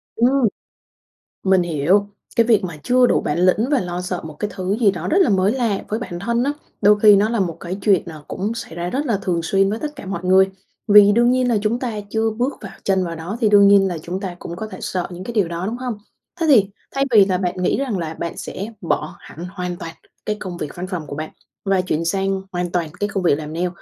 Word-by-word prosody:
Ừm. 250 +2 +3 1.0
Mình 190 -1 +4
hiểu. 175 +5 +2 0.3
Cái 230 - +4
việc 220 -3 +3
mà 170 -4 -5
chưa 250 0 +4
đủ - - +2
bản 150 - -1
lĩnh 185 +7 +3
và 285 - +4
lo 180 -3 -4
sợ 180 -1 -3
một 155 - -8
cái 210 - -2
thứ 190 +2 -2
gì 215 -5 +5
đó 185 - -5
rất 340 - +2
là 325 - +4
mới 195 0 +3
lạ 230 -5 -1
với 215 +2 -2
bản 175 -6 -6
thân 235 +5 0
á, 280 - +1 0.3
đôi 210 +1 +5
khi 210 -1 +8
nó 205 +2 +3
là 230 -1 0
một 175 -4 -1
cái 180 +2 -5
chuyện, 195 -5 +3
à, 160 -3 -8
cũng 205 +4 -3
xảy 230 -8 -7
ra 175 +1 -3
rất 275 +9 -2
là 230 -7 +1
thường 175 -3 -1
xuyên 195 +3 +2
với 215 +3 -2
tất 300 +2 -5
cả - - -9
mọi 185 -2 -4
người, 190 +1 +5 0.4
vì 205 0 +8
đương 240 +3 +4
nhiên 255 0 +2
là 230 - +2
chúng 220 +3 0
ta 250 -2 -2 0.2
chưa 220 +1 +1
bước 255 +4 0
vào - - -8
chân 190 -1 +2
vào 170 -2 -4
đó 170 +7 -5
thì 215 - +4
đương 200 -1 +7
nhiên 200 -1 +6
là 175 - -3
chúng 175 +4 -5
ta 190 -3 -5
cũng 170 - -7
có 215 +5 -5
thể - - -9
sợ 180 -2 -2
những 175 +1 -7
cái 235 - -6
điều 205 -6 +2
đó, 170 +2 -4
đúng 225 +4 -3
không? 250 -3 -4 0.4
Thế 330 - +1
thì 210 -8 +5 0.2
thay 275 0 0
vì 210 -4 +7
là 185 -2 0
bạn 180 -1 -2
nghĩ - - +2
rằng 260 -7 -1
là 165 -3 -4
bạn 170 +1 -5
sẽ 200 - -5
bỏ 155 -3 -2
hẳn 170 - -10
hoàn 180 -2 -4
toàn 165 -1 -8 0.3
cái 210 - -1
công 180 -3 -6
việc 150 -4 -6
văn 180 +1 -5
phòng 175 -5 -5
của 145 - -6
bạn 155 +1 -5 0.4
và 195 -1 +2
chuyển 165 -3 -2
sang 195 +2 0
hoàn 175 -1 -2
toàn 170 -3 -1
cái 205 - -1
công 195 -3 -2
việc 170 - +4
làm 155 0 -7
nail 175 +2 0
195 Hz, 265 wpm, -20 LUFS, 175-220 Hz, 1.0 s, khi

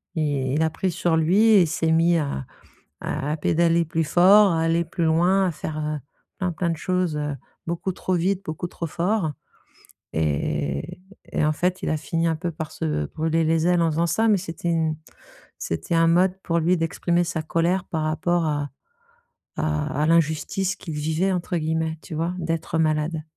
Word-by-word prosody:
i 140 -4 0
il 160 - +2
a 160 - +2
pris 185 +2 -1
sur 170 -1 +1
lui 170 +6 +3
et 220 -4 +6
il - - 0
s'est 160 0 0
mis 165 +1 +4
à 140 - -2 0.6
à 145 +3 -3
à - - -1
pédaler 165 +2 +2
plus 160 +1 -1
fort, 190 +4 +6
à 165 - +1
aller 165 +1 +2
plus 170 +1 -3
loin, 180 +4 +3
à - - +1
faire, 155 0 -5
heu, 150 0 -2 0.4
plein, 180 -2 -1
plein 170 +2 -1
de 165 - -1
choses, 180 -4 -1
heu, 150 -1 -2 0.3
beaucoup 170 +3 -2
trop 185 +1 -2
vite, 185 +3 0
beaucoup 160 +1 -4
trop 170 - -5
fort 175 0 0 0.8
et 75 -2 0
et - - -11 0.3
et - - +1
en 155 - +3
fait, 180 +4 -1
il - - -1
a 155 - +1
fini 165 +2 -1
un 160 - 0
peu 175 +2 -3
par 155 0 -6
se 75 -1 -2
brûler 160 - 0
les 165 +1 +2
ailes 175 -1 +3
en 165 - +2
faisant 165 +2 +1
ça 225 +6 +1
mais 205 -3 +4
c'était 170 -1 -5
une 160 -2 0 0.6
c'était 85 - -2
un 165 0 +4
mode, 180 +2 +3
pour 170 0 +1
lui, 175 +2 +2
d'exprimer 170 +1 0
sa 165 -2 -3
colère 175 +4 0
par 160 -2 -3
rapport 165 +2 0
à 145 -2 -1 0.9
à 155 -1 -1
à - - +3
«l'injustice 165 +4 +1
qu'il 160 -4 -7
vivait», 160 +5 0
entre 175 0 -2
guillemets, 160 0 -1
tu 160 - -8
vois, 170 +3 -1
d'être 165 -1 -2
malade. 155 0 0
165 Hz, 200 wpm, -24 LUFS, 155-175 Hz, 0.9 s, et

